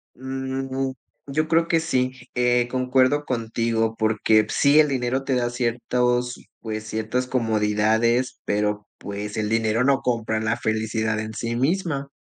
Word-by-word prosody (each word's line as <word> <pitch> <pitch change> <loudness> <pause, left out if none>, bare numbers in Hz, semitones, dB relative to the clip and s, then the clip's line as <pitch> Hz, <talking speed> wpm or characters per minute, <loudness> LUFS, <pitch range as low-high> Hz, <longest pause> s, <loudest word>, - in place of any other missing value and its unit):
Mm, 130 0 -3 0.4
yo 155 +3 0
creo 165 +1 +2
que 165 - +3
sí, 130 -6 0 0.2
eh, 125 0 +2
concuerdo 130 +3 +2
contigo 115 -2 -1
porque 110 0 +3
sí, 145 +2 +4
el 150 -1 +5
dinero 130 0 -1
te 135 - 0
da 120 -1 +1
ciertos, 125 0 0 0.2
pues 110 -1 -5
ciertas 110 +4 -2
comodidades, 110 +1 +1
pero, 105 0 -1
pues, 105 +2 -6
el 105 - 0
dinero 115 +1 +1
no 140 0 +3
compra 115 -3 -1
la 110 +2 0
felicidad 110 -1 -1
en 110 0 -5
sí 115 +2 -3
misma. 140 +1 0
120 Hz, 145 wpm, -23 LUFS, 110-130 Hz, 0.4 s, el